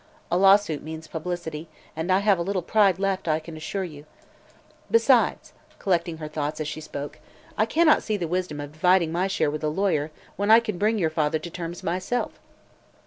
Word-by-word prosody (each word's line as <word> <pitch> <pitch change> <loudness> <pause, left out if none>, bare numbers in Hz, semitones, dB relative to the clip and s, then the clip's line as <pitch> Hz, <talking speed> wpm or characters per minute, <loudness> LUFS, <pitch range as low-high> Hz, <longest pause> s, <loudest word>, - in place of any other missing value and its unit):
A - - +2
lawsuit 195 -5 +4
means 160 +1 -7
publicity, 160 -1 -5 0.3
and 160 +4 -2
I 190 +2 +4
have 200 -3 +3
a - - 0
little 185 0 -1
pride 200 -1 +3
left, 195 -2 -1
I 155 0 +2
assure 165 +4 -4
you. 155 -4 -9 0.8
Besides," 460 - +3 0.2
collecting 170 -3 0
her 155 -1 -6
thoughts 150 0 -3
as 155 - -2
she 155 - -5
spoke, 145 -1 -7 0.4
"I 215 - +2
cannot 315 +5 +4
see 215 - -2
the 175 -4 -3
wisdom 175 -3 -2
of 145 0 -6
dividing 170 +1 +3
my 180 +3 0
share 190 -6 0
with 150 +1 -5
a 155 - +1
lawyer 160 -3 0 0.3
when 205 +1 -1
I 225 +1 +9
can 215 -6 -4
bring 220 +2 +2
your 165 -5 +1
father 155 0 +1
to 170 - -7
terms 170 0 -6
myself. 185 +8 -2
175 Hz, 195 wpm, -25 LUFS, 155-195 Hz, 0.8 s, I